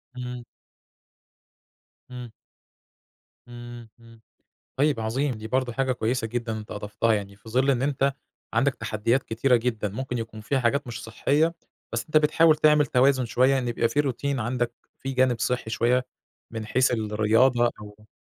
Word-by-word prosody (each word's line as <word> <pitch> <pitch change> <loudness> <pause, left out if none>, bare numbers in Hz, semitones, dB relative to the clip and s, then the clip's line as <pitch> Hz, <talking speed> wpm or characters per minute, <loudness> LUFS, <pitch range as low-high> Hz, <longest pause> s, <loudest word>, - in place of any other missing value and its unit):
إمم. 125 -1 -6 1.7
إمم. 125 -2 -8 1.2
إمم، 120 -1 -10
إمم، 115 -1 -17 0.6
طيب 140 -3 +2
عظيم 125 +4 -1
دي 110 0 -8
برضه 130 -1 0
حاجة 130 +1 0
كويسة 115 0 -1
جدًا 115 -1 -3
أنت 105 - -10
أضفتها، 105 +2 -1
يعني 100 -1 -4
في 110 +2 -16
ظِل 130 +4 +2
إن 130 -1 +1
أنت 140 -1 +1 0.4
عندك 130 +3 +2
تحديات 115 +5 0
كتيرة 120 +3 +2
جدًا، 115 -3 -1
ممكن 125 +4 -4
يكون 110 -1 -6
فيها 135 +5 -1
حاجات 140 +4 +1
مش 115 -2 -6
صحّية، 150 +8 +1 0.4
بس 115 0 -2
أنت 155 - -2
بتحاول 155 +1 +5
تعمل 150 -1 +4
توازن 130 0 +3
شوية 130 +3 +3
إن 125 -2 -2
يبقى 115 0 +1
في 145 - +1
روتين 140 -1 -2
عندك، 120 +1 -1 0.3
في 135 0 -4
جانب 125 -3 +2
صحّي 125 -2 -1
شوية، 125 +3 +1 0.4
من 110 -1 -5
حيث 130 +3 +2
الرياضة 115 +3 +2
أو 105 +1 -13
120 Hz, 155 wpm, -25 LUFS, 115-135 Hz, 1.7 s, بتحاول